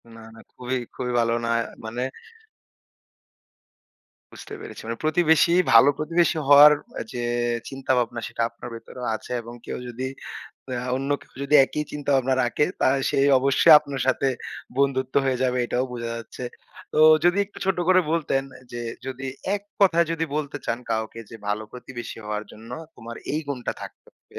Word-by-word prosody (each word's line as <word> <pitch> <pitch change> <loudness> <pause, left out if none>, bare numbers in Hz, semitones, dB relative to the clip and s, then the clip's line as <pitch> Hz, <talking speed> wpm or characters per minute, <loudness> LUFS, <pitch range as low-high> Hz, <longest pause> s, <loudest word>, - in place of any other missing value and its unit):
না, 115 - -12
না 115 - -13
খুবই, 125 +1 -3 0.2
খুবই 125 -1 -3
ভালো 115 0 +2
না - - -2 0.4
মানে 120 +3 -3 2.3
বুঝতে - - -10
পেরেছি। - - -9
মানে 115 0 -4
প্রতিবেশী 160 +1 +4 0.2
ভালো 115 +5 +8
প্রতিবেশী 165 +2 +1
হওয়ার 145 +1 +10 0.3
অ - - -2
যে, 120 - -3 0.5
চিন্তা 135 -1 -3
ভাবনা 120 -1 -1
সেটা - - -4
আপনার 120 +1 -10
ভেতরেও 125 +2 -8
আছে 125 - -10
এবং 120 +1 -10
কেউ - - -4
যদি 130 +2 -4 0.7
আ - - -2 0.2
অন্য 135 +2 -3
কেউ - - -20
যদি 145 +2 0
একই 150 +3 -3
চিন্তা 145 -1 -3
ভাবনা 130 0 +2
রাখে 120 +5 +1 0.2
তা - - +4 0.2
সে - - 0 0.2
অবশ্যই 140 +5 +5
আপনার 140 -2 -6
সাথে 130 +1 +2 0.5
বন্ধুত্ব 130 -2 +1
হয়ে 130 -1 0
যাবে 125 -1 +1
এটাও 125 +2 0
বোঝা 120 -1 -4
যাচ্ছে। 115 +2 -8 0.5
তো - - +2 0.2
যদি 175 +3 +4
একটু 205 - -13
ছোট্ট 190 -1 0
করে 185 0 +6
বলতেন 150 -5 +1 0.3
যে, 120 - -5
অ্যা - - -10
যদি 130 0 -5 0.3
এক 200 - -3 0.2
কথায় 170 -4 +5
যদি 165 0 -1
বলতে 145 -1 -3
চান 115 - -1
কাউকে 110 +1 -2
যে, 115 - -8
ভালো 105 +1 -1
প্রতিবেশী 125 -2 -8
হওয়ার 105 0 -3
জন্য 115 +2 -13 0.3
তোমার 115 0 -9 0.2
এই 155 - 0
গুণটা 125 -4 -3
থাকতে - - -11
হবে, - - -13
130 Hz, 170 wpm, -24 LUFS, 120-150 Hz, 2.3 s, হওয়ার